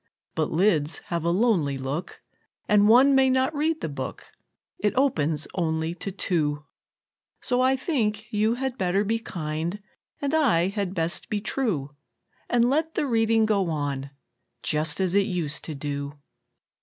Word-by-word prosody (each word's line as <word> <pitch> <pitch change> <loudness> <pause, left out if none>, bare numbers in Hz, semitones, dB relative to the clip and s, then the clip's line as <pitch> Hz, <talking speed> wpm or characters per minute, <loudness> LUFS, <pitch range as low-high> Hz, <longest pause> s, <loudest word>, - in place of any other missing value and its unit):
But 155 -2 0
lids 165 -4 +2 0.2
have 170 -2 -1
a 170 - +1
lonely 175 - +2
look, 135 +6 -5 0.4
And 210 0 +5
one 260 +5 +7
may 265 -1 +5
not 260 +3 +2
read 310 +2 0
the - - -2
book 140 -3 -6 0.5
It 210 0 0
opens 160 - +1
only 160 -2 -1
to 190 +3 -5
two; 150 -6 -1 0.7
So 250 0 0
I 260 +1 +4
think 220 -7 -1
you 215 +2 +2
had 265 0 -3
better 190 +2 +1
be 225 +2 0
kind, 165 -1 -4 0.4
And 285 +1 -2
I 225 - +3
had 200 -2 -3
best 165 0 -2
be 210 - -1
true, 195 - -2 0.5
And 240 0 +3
let 315 +5 0
the - - +1
reading 225 -3 +3
go 200 -5 +1
on, 140 -3 -2 0.5
Just 150 +2 +1
as 185 -2 +1
it 200 0 +3
used 170 -6 -2
to 155 - -5
do. 140 0 -4
195 Hz, 155 wpm, -25 LUFS, 155-235 Hz, 0.7 s, one